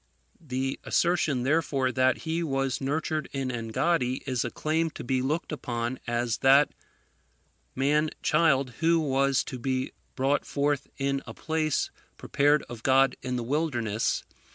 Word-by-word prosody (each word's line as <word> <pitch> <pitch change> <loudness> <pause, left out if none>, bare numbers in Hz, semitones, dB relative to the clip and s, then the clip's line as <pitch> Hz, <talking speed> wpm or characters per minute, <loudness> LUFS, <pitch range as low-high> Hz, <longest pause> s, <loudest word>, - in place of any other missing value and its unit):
The 135 -1 -2
assertion, 155 -7 +1
therefore, 135 -2 +1
that 130 +1 +2
he 165 +1 -1
was 135 -5 -1
nurtured 155 +2 -1
in 135 -2 -2
Engaddi, 125 +4 0
is 130 -3 0
a 120 - -2
claim 160 +5 0
to 150 - -9
be 130 +1 0
looked 155 +8 -2
upon 120 -4 -3
as 120 -2 -1
that 140 +2 +5 1.0
man 150 +4 +2
child 140 -5 +3
who 165 0 +3
was 140 -2 +2
to 130 - -7
be 130 +1 -1 0.2
brought 135 +2 +1
forth 145 -1 -1
in 140 0 0
a - - -8
place 155 -2 -1 0.3
prepared 145 0 +2
of 120 -2 -9
God 135 +1 +4
in 125 0 -3
the 120 - -2
wilderness. 120 -6 0
135 Hz, 145 wpm, -27 LUFS, 130-155 Hz, 1.0 s, that